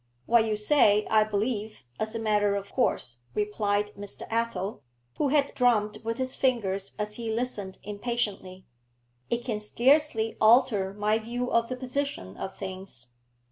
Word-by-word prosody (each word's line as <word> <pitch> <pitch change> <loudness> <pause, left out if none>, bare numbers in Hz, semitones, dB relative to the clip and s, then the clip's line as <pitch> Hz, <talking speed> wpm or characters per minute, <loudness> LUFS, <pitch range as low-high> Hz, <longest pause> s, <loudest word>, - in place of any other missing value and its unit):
'What 235 -1 +4
you 215 -1 -1
say, 210 -3 +4
I 215 -1 +6
believe, 215 - -2 0.2
as 220 +1 -2
a - - -1
matter 210 -2 +2
of 200 0 -5
course,' 120 - 0 0.2
replied 210 0 0
Mr. 200 0 -5
Athel, 230 -5 -2 0.4
who 295 - +2
had 280 0 +2
drummed 215 -4 +2
with 230 +1 -2
his 260 0 +1
fingers 200 -7 0
as 210 0 -2
he 230 -2 -3
listened 220 -5 -2
impatiently. 205 -3 -3 0.6
'It 235 0 -1
can 225 -4 -2
scarcely 240 +1 +2
alter 220 -4 +4
my 210 +1 +1
view 240 +3 -3
of 230 0 +2
the 255 - -2
position 255 - -3
of 190 - -6
things. 190 -11 -7
215 Hz, 150 wpm, -27 LUFS, 205-240 Hz, 0.6 s, I